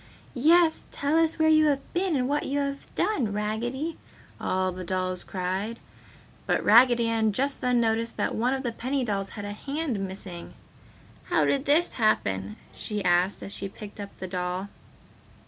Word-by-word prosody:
"Yes! 320 +5 +4
Tell 285 +2 -1
us 325 -1 +3
where 315 -1 +3
you 310 0 +6
have 275 -2 -1
been 360 -2 +1
and 250 -2 +1
what 290 +2 0
you 280 - -1
have 280 -1 -2
done, 345 - +1
Raggedy!" 240 +9 -2 0.4
all 185 0 0
the 185 +1 -6
dolls 185 0 -2
cried. 190 +5 -3 0.7
But - - +1
Raggedy 235 +1 +6
Ann 220 -2 +1
just 275 +6 0
then 250 -1 +2
noticed 230 0 0
that - - 0
one 250 +4 +1
of 265 - -4
the 240 - -1
penny 260 +4 -2
dolls 200 -4 -2
had 205 - -5
a 205 - -4
hand 275 +2 -3
missing. 190 -2 -7 0.7
"How - - +2
did 275 0 +1
this 315 +5 +3
happen?" 100 - 0 0.2
she 210 -3 -4
asked 180 +2 +2
as 200 - -7
she 195 - -5
picked 205 +1 -11
up 200 -1 -8
the 185 - -6
doll. 180 +1 -3
230 Hz, 175 wpm, -27 LUFS, 195-280 Hz, 0.7 s, you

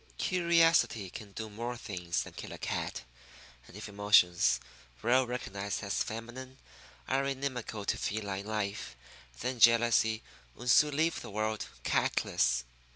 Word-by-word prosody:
Curiosity 165 - +3
can 105 -2 -9
do 110 +1 -5
more 120 +3 -5
things 90 -7 -3
than - - -11
kill - - -8
a - - -7
cat; - - -3 0.6
and 95 - -12
if 105 - -7
emotions, 100 -4 +4 0.4
well 125 +2 +4
recognized 100 -5 -4
as 100 -1 -1
feminine, 120 +4 -6 0.5
are 135 +1 +1
inimical 130 -6 -3
to - - 0
feline 100 -2 -3
life, 100 - -3 0.5
then 125 0 -2
jealousy 115 -1 +5 0.3
would 125 - 0
soon 150 +2 +5
leave 160 +1 +1
the - - -8
whole - - -10
world 110 0 -1 0.2
catless. 60 0 +1
110 Hz, 140 wpm, -31 LUFS, 100-130 Hz, 0.6 s, jealousy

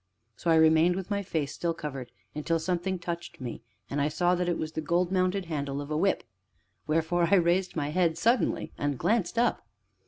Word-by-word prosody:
So 170 - -3
I 165 - +6
remained 160 +2 +5
with 190 +1 -5
my 200 0 +1
face 160 -7 -2
still 170 -1 -2
covered 140 -6 -6 0.2
until 165 +2 0
something 180 +3 -1
touched 170 0 -6
me, 120 -3 -6 0.3
and 140 +1 -2
I 145 - +2
saw 175 +4 +2
that 180 0 0
it 170 - 0
was 155 - -3
the 160 - -3
gold 175 +3 +1
mounted 185 0 +1
handle 140 -4 -3
of 145 +1 -6
a - - 0
whip, 190 +5 +1 0.6
wherefore 165 +2 +2
I 200 - +6
raised 180 +1 +2
my 145 -3 -1
head 165 0 +1
suddenly 235 +7 +1
and 145 -2 -1
glanced 215 - 0
up. 240 +1 +2
170 Hz, 200 wpm, -28 LUFS, 155-180 Hz, 0.6 s, I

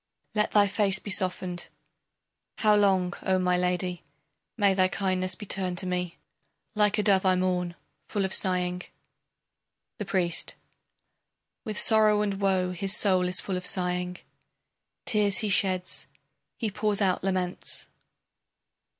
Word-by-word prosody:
Let 210 -1 +1
thy 205 -1 +4
face 200 -1 +2
be 200 - -4
softened! 180 -2 -1 0.9
How 215 -1 +4
long, 190 -3 +2
O 190 0 +1
my 180 -1 +1
lady! 180 0 -1 0.5
May 200 -3 +3
thy 185 -1 +3
kindness 185 -1 -1
be 210 - -9
turned 185 -2 -2
to 185 - -1
me! 180 -1 -3 0.6
Like 210 0 +2
a 210 - +1
dove 195 -2 +3
I 185 -1 +3
mourn, 180 -1 -1 0.3
full 200 -3 -1
of 190 - +1
sighing. 180 -1 +1 1.2
The 210 - -3
Priest: 180 -3 -1 1.1
With 215 -1 -4
sorrow 215 -1 +4
and 200 -1 -3
woe 190 -2 +1
His 195 +3 +1
soul 185 -3 +2
is 180 +1 +3
full 190 -2 -3
of 180 - -6
sighing, 180 0 +1 0.9
Tears 205 -3 +2
he 215 -3 0
sheds, 185 -2 0 0.5
he 220 -4 -2
pours 210 0 -1
out 190 -4 +1
laments. 185 -2 -3
190 Hz, 140 wpm, -27 LUFS, 180-205 Hz, 1.2 s, thy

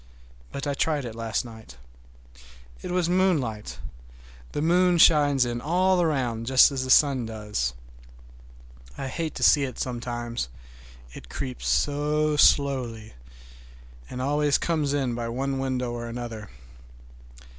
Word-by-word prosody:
But 140 - -5
I 145 - -1
tried 145 -1 -1
it 115 - -6
last 115 0 -3
night. 110 - -12 1.0
It - - -6
was 180 -1 0
moonlight. 165 - 0 0.7
The - - -3
moon 180 +1 +3
shines 145 -5 +5
in 120 0 -3
all 180 +5 +2
around, 125 -8 -1
just 130 +2 +6
as 135 -2 -2
the 130 - -6
sun 130 -4 +4
does. 105 - -3 1.2
I 135 - -4
hate 160 +3 -4
to - - -4
see 145 - +6
it 130 -2 -5
sometimes, 120 - -4 0.6
it - - -12
creeps 130 -2 -5
so 150 +1 +1
slowly, 130 -7 +2 1.0
and 130 0 -5
always 145 +1 +2
comes 155 -4 -1
in 130 -4 -1
by 115 0 -4
one 135 +3 -2
window 130 -2 -2
or 120 0 -5
another. 115 -3 -7
130 Hz, 135 wpm, -25 LUFS, 120-150 Hz, 1.2 s, just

